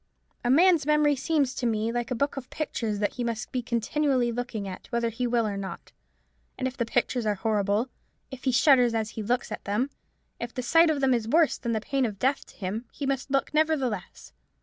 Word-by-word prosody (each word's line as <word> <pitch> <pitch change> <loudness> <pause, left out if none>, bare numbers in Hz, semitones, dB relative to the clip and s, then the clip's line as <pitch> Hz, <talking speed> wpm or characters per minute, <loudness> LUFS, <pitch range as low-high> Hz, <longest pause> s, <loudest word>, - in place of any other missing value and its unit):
A 240 - 0
man's 325 +1 +5
memory 300 -1 +4
seems 280 -1 +1
to 245 - -1
me 220 0 0
like 240 0 -2
a 250 - -1
book 280 +5 0
of 265 -2 -7
pictures 230 -8 -2
that 205 0 0
he 245 - -3
must 230 -2 -3
be 250 - -1
continually 245 +2 0
looking 230 -4 -4
at, 185 - -8
whether 235 0 0
he 245 +2 -2
will 235 -1 +2
or 205 -2 -2
not: 195 -1 -7 0.7
and 260 - -1
if 260 - -6
the 235 -3 -2
pictures 245 +1 0
are 210 - +2
horrible, 210 +2 0 0.4
if 265 0 -9
he 260 - +3
shudders 250 -2 +5
as 220 -1 -1
he 220 - -5
looks 240 +2 -1
at - - -5
them, 240 +8 0 0.5
if 235 0 -6
the 250 - -3
sight 330 +7 +5
of 295 -3 0
them 265 -1 +4
is 230 -2 0
worse 315 +5 +3
than 235 -2 -2
the 220 - -1
pain 275 +3 0
of 205 -2 -7
death 265 +6 0
to - - -17
him, 210 +5 -4
he 285 - -5
must 270 0 -1
look 275 +2 0
nevertheless. 275 - -1
245 Hz, 225 wpm, -27 LUFS, 225-275 Hz, 0.7 s, man's